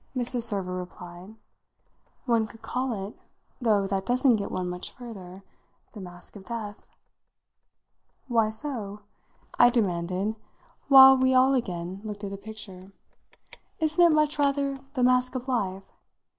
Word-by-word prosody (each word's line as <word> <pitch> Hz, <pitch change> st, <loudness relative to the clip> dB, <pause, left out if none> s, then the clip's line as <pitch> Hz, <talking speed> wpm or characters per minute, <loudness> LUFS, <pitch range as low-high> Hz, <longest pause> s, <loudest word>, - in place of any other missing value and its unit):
Mrs. 245 Hz, 0 st, -1 dB
Server 200 Hz, -5 st, -1 dB
replied. 180 Hz, +2 st, -9 dB, 0.9 s
"One 230 Hz, -3 st, +2 dB
could 225 Hz, +1 st, -16 dB
call 240 Hz, -4 st, -2 dB
it 210 Hz, -, -11 dB, 0.5 s
though 210 Hz, -4 st, +2 dB
that 195 Hz, -1 st, -1 dB
doesn't 245 Hz, +1 st, +3 dB
get 200 Hz, -, -4 dB
one 185 Hz, -1 st, -3 dB
much 180 Hz, 0 st, -5 dB
further 195 Hz, -6 st, -10 dB, 0.5 s
the 210 Hz, -, -9 dB
Mask 180 Hz, +1 st, -12 dB
of 200 Hz, -, -10 dB
Death." 220 Hz, -3 st, -6 dB, 1.4 s
"Why 225 Hz, -4 st, +2 dB
so?" 220 Hz, -4 st, -5 dB, 0.6 s
I 240 Hz, -, +8 dB
demanded 190 Hz, -2 st, -1 dB, 0.5 s
while 265 Hz, -1 st, +10 dB
we 260 Hz, 0 st, +2 dB
all 260 Hz, +1 st, +5 dB
again 185 Hz, -6 st, -3 dB
looked 210 Hz, -1 st, -6 dB
at 200 Hz, -, -4 dB
the 200 Hz, -, -5 dB
picture. 200 Hz, -2 st, -10 dB, 0.9 s
"Isn't 315 Hz, +2 st, +3 dB
it 340 Hz, -, +7 dB
much 305 Hz, -1 st, +2 dB
rather 280 Hz, -1 st, +1 dB, 0.2 s
the 255 Hz, -, +1 dB
Mask 255 Hz, +1 st, +3 dB
of 255 Hz, +1 st, -4 dB
Life? 195 Hz, -7 st, -2 dB
220 Hz, 140 wpm, -27 LUFS, 195-255 Hz, 1.4 s, while